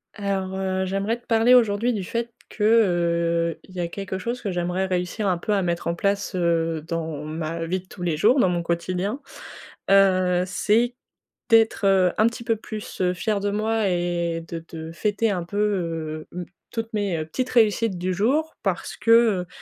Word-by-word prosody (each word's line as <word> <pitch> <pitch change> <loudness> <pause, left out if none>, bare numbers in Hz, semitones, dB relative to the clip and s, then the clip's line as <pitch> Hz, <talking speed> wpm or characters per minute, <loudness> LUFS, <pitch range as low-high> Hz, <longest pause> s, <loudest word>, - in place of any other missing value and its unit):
Alors 195 -2 -2
heu, 190 0 -1
j'aimerais 200 +5 -1
te - - -31
parler 230 +2 +5
aujourd'hui 225 0 +3
du 210 -5 -2
fait 235 +5 -3 0.2
que, 210 - -4
heu, 170 -6 +2
il 185 - -16
y 185 - -6
a 175 - 0
quelque 190 +1 -5
chose 235 +6 -4
que 200 - -2
j'aimerais 180 +1 -1
réussir 185 +3 -2
un 180 -3 +1
peu 210 - -1
à 195 -2 +1
mettre 170 -1 -2
en 170 - 0
place, 200 +2 -1
heu, 165 -2 0
dans 160 -3 -3
ma 160 +1 -4
vie 185 +3 -1
de 185 - -17
tous 180 - -9
les 170 -3 0
jours, 225 - +4
dans 190 - +4
mon 175 -1 0
quotidien, 180 +7 -2 0.7
heu, 185 -2 +4
c'est 225 +5 +1 0.6
d'être, 225 -3 +4
heu, 190 -2 +4
un 220 - +6
petit 235 0 -4
peu 230 -1 +1
plus, 215 -2 -7
heu, 180 -1 +2
fière 210 +3 -1
de 205 - 0
moi 215 0 0
et 175 -1 -1
de 165 -1 -6
de 160 0 -7
fêter 210 +5 0
un 180 -3 -2
peu, 205 +4 -6 0.8
heu, 180 0 -5 0.3
toutes 225 -1 -4
mes, 200 -5 0
heu, 155 - -3
petites 255 +10 -2
réussites 225 -3 +3
du 185 +1 -1
jour, 275 - +1
parce - - -2
que, - - -4
heu, 220 -6 +4
190 Hz, 195 wpm, -24 LUFS, 175-220 Hz, 0.8 s, un